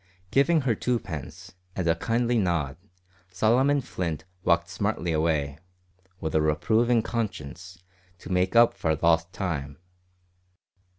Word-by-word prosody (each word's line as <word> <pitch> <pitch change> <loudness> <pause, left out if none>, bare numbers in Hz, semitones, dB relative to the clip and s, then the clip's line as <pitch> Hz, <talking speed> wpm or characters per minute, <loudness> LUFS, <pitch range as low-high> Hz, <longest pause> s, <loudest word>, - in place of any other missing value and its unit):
Giving 155 +4 +4
her 130 -4 +1
twopence, 95 - -4 0.2
and 90 -3 -1
a 80 - +5
kindly 120 +3 +1
nod, 85 -8 0 0.6
Solomon 125 +9 +3
Flint 85 - -4 0.2
walked 85 -1 +2
smartly 85 0 -2
away 75 -3 0 0.6
with 80 -1 -3
a 80 - +3
reproving 110 +10 +2
conscience 90 -5 -5 0.3
to 90 - -10
make 90 +3 +1
up 115 0 +6
for 80 -1 0
lost 85 +2 +2
time. 75 -8 -4
90 Hz, 120 wpm, -26 LUFS, 80-115 Hz, 0.6 s, up